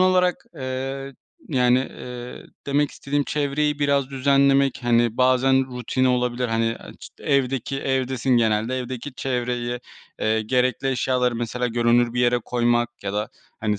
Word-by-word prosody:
olarak, 185 -1 +3
eee, 135 +1 -4 0.3
yani, 125 -3 +3
eee, 125 -1 -7 0.2
demek 145 +1 +1
istediğim 145 0 -2
çevreyi 150 0 0
biraz 140 -2 +1
düzenlemek, 140 0 +3
hani, 120 -1 +2
bazen 130 +1 +3
rutini 130 +2 0
olabilir. 125 0 0
Hani, 115 0 0
aaa, - - -11
ç - - -9
evdeki, 135 -1 0
evdesin 130 -1 0
genelde, 115 +2 +1
evdeki 125 +2 -6
çevreyi, 125 -2 -2 0.4
eee, 110 0 +1
gerekli 130 +3 +1
eşyaları 125 -1 +1
mesela 120 +1 -2
görünür 120 0 +2
bir 125 - +1
yere 120 0 +3
koymak 120 -1 +1
ya 100 - -3
da, 105 +1 -2 0.3
hani, 105 -2 0
125 Hz, 140 wpm, -23 LUFS, 120-135 Hz, 0.4 s, olarak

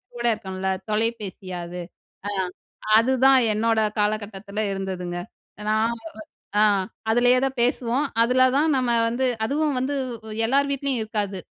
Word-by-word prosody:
கூட 240 0 -4
இருக்கும்ல 190 -3 -4 0.2
தொலைபேசியா 210 -4 -2
அது. 180 +1 -6 0.5
அ - - -1 0.7
அதுதான் 260 +2 +5
என்னோட 225 +1 +2 0.2
காலகட்டத்தில 210 0 -2
இருந்ததுங்க. 185 -2 -4 0.5
நான் 220 +2 +2 0.7
அ - - +6 0.5
அதுலயே 245 +2 +4
தான் 265 0 -3
பேசுவோம். 250 +3 +1 0.2
அதுல 255 +2 +4
தான் 310 +2 +3
நம்ம 250 -2 +1 0.2
வந்து 255 +2 0 0.2
அதுவும் 295 +2 0
வந்து 275 +3 -1 0.5
எல்லார் 280 +3 +2
வீட்லயும் 275 -3 -1
இருக்காது. 205 -3 -3
230 Hz, 120 wpm, -24 LUFS, 205-260 Hz, 0.7 s, அ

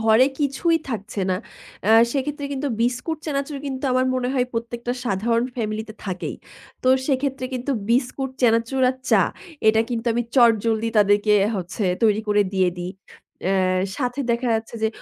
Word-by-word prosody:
ঘরে 220 +3 +5
কিছুই 300 +4 +1
থাকছে 210 -4 -4
না। 185 - +1 0.5
আ - - +5 0.2
সেক্ষেত্রে 285 +1 -2
কিন্তু 280 +1 -2
বিস্কুট, 250 +7 -1
চানাচুর 280 -1 -2
কিন্তু 265 0 -4
আমার 255 0 +2
মনে 250 -1 -1
হয় 250 -2 +2
প্রত্যেকটা 235 +1 -3
সাধারণ 230 +2 +1
ফ্যামিলিতে 220 -1 -3
থাকেই। 185 -3 -4 0.5
তো 255 - +2 0.2
সেক্ষেত্রে 270 -1 -1
কিন্তু 255 +3 -2 0.2
বিস্কুট, 255 +2 0
চানাচুর 230 +3 +2
আর 260 - -7
চা। - - +6 0.5
এটা 220 0 +5
কিন্তু 235 0 -3
আমি 240 - 0
চটজলদি 230 -2 +3
তাদেরকে 205 +1 +4 0.2
হচ্ছে 185 +3 -3 0.2
তৈরি 215 -1 +4
করে 205 0 +4
দিয়ে 190 -2 +3
দিই। 180 +1 -4 0.6
আ - - +2 0.4
সাথে 250 0 -2
দেখা 240 +1 -1
যাচ্ছে 220 +1 -3
যে 220 - +3
235 Hz, 155 wpm, -23 LUFS, 220-265 Hz, 0.6 s, চা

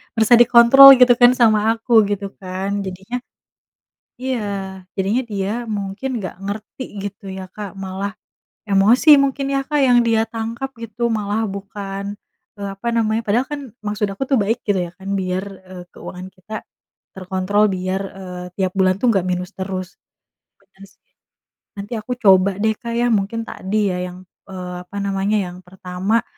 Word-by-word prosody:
merasa 225 +1 +3
dikontrol 240 +3 +9
gitu 250 -1 +7
kan 245 0 +8
sama 220 -3 +4 0.2
aku 230 +2 -11 0.2
gitu 200 -1 -2
kan, 190 +2 -3
jadinya 190 +6 -5 1.1
iya. 260 -1 -1 0.6
Jadinya 210 +7 +1
dia 195 -1 -2 0.3
mungkin 200 +6 -4
nggak 185 -4 -6
ngerti 210 +6 -6 0.2
gitu 200 0 -7
ya, 190 0 -7
Kak, 205 -2 -6
malah 195 +1 -4 0.6
emosi 205 +9 +4
mungkin 275 0 0
ya, 275 - +1
Kak, 295 -1 +1
yang 245 -1 +5
dia 225 0 +3
tangkap 230 +4 -5
gitu 230 +1 -2
malah 215 +1 -1
bukan, 200 0 -6 0.5
eee, 200 -1 -5
apa 195 +5 -5
namanya 220 0 +1
padahal 230 +5 +1
kan 290 - -3 0.2
maksud 210 0 -1
aku 195 +7 -4
tuh 270 -1 +1
baik 220 +4 0
gitu 200 -3 +1
ya - - -12
kan, 195 0 -10
biar, 185 +1 -2 0.2
eee, 180 -1 -9
keuangan 185 +1 -9
kita 190 +4 -8 0.5
terkontrol, 190 +2 0
biar, 185 +1 -2 0.2
eee, 180 -1 -7
tiap 185 -2 -1
bulan 185 -1 +4
tuh 250 - +1
nggak 190 -3 +1
minus 180 0 -2
terus. 185 -1 -4 0.7
Bener 195 0 -18
sih. - - -29 0.8
Nanti 200 +4 -6
aku 230 +4 -4
coba 195 -3 +4
deh, 220 +1 +1
Kak, 235 -2 -6
ya, 240 0 +2
mungkin 215 +3 -1
tadi 205 +1 -1
ya - - -3
yang, 180 +1 -12 0.3
eee, 180 -1 -6
apa 200 - -8
namanya, 200 +2 0
yang 180 - -11
pertama, 190 +5 -2
200 Hz, 160 wpm, -20 LUFS, 190-230 Hz, 1.1 s, dikontrol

